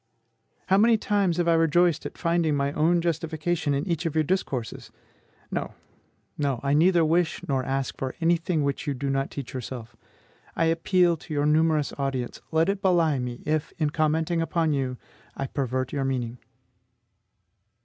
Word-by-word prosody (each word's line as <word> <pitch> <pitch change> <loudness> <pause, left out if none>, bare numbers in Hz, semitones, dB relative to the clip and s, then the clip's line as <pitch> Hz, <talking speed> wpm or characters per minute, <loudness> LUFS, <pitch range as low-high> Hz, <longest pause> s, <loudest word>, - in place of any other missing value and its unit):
How 195 +1 +3
many 225 +1 +5
times 200 -5 +1
have 175 -1 +1
I 170 - +5
rejoiced 165 0 +3
at - - -13
finding 170 -3 +1
my 140 0 0
own 165 +4 +2
justification 160 -2 -1
in 140 +6 -2
each 170 -1 -1
of 160 - -4
your 155 - +3
discourses! 140 - -3 0.6
No, - - -3 0.6
no; 140 -4 0
I 140 0 +1
neither 170 +2 +4
wish 170 +2 0
nor 135 -3 0
ask 135 0 -2
for 130 -1 -3
any 170 +1 +3
thing 165 -2 -1
which 140 +2 -2
you 140 - 0
do 135 +2 -2
not 135 0 -1
teach 140 -4 -7
yourself. 125 -2 -7 0.6
I 165 - +2
appeal 170 +1 +2
to 155 - -9
your 145 0 +1
numerous 155 -1 +2
audience; 135 -3 -3
let 160 +1 +3
it 195 0 -1
belie 170 -7 +3
me 125 -1 -5
if, 155 0 -1
in 150 -2 0
commenting 160 +2 +1
upon 165 -1 0
you, 130 -2 -2 0.4
I 135 - -2
pervert 130 -2 -2
your 140 -2 -1
meaning. 125 -3 -2
155 Hz, 170 wpm, -26 LUFS, 135-170 Hz, 0.6 s, many